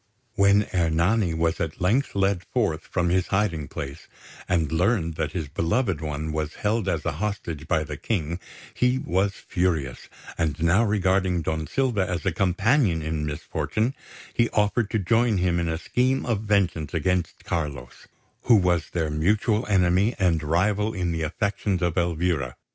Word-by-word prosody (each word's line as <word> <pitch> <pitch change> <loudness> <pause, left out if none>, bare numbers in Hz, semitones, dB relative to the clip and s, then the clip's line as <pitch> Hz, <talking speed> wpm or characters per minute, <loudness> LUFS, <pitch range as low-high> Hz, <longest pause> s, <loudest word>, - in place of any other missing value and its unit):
When 100 0 +4
Ernani 85 +2 +2
was 80 0 0
at 80 -2 -3
length 105 +10 +1
led 95 -2 +1
forth 100 -11 -1
from 90 -2 0
his 90 +1 +1
hiding 95 -7 0
place, 70 +1 -7 0.4
and 80 -5 +1
learned 85 0 +1
that 75 - -2
his 80 -5 -3
beloved 85 - 0
one 75 0 -3
was 80 0 -3
held 105 -1 0
as 80 -4 -2
a 80 - +1
hostage 85 -7 -3
by 80 - +1
the 75 -2 -6
King, 85 -4 -2 0.3
he 125 +1 +2
was 95 -3 0
furious; 80 -8 -2 0.3
and 80 -2 0
now 85 +7 +3
regarding 95 -4 +1
Don 80 0 -2
Silva 120 -9 0
as 90 0 -3
a 95 - +2
companion 95 - +2
in 75 -1 -2
misfortune, 80 - -2 0.4
he 120 -1 +2
offered 105 +1 +1
to 110 - 0
join 115 +2 +2
him 90 -1 +1
in 85 -1 -1
a 80 - -1
scheme 130 +9 0
of 115 -4 0
vengeance 95 -7 0
against 90 +1 -1
Carlos, 70 -7 -4 0.4
who 120 - +6
was 90 -5 +2
their 80 -3 -1
mutual 105 +8 +1
enemy 95 +3 +3
and 85 -5 +2
rival 100 +8 +1
in 90 -2 -1
the 80 -1 -2
affections 100 +3 -1
of 85 -2 0
Elvira. 85 -6 0
90 Hz, 165 wpm, -25 LUFS, 80-105 Hz, 0.4 s, who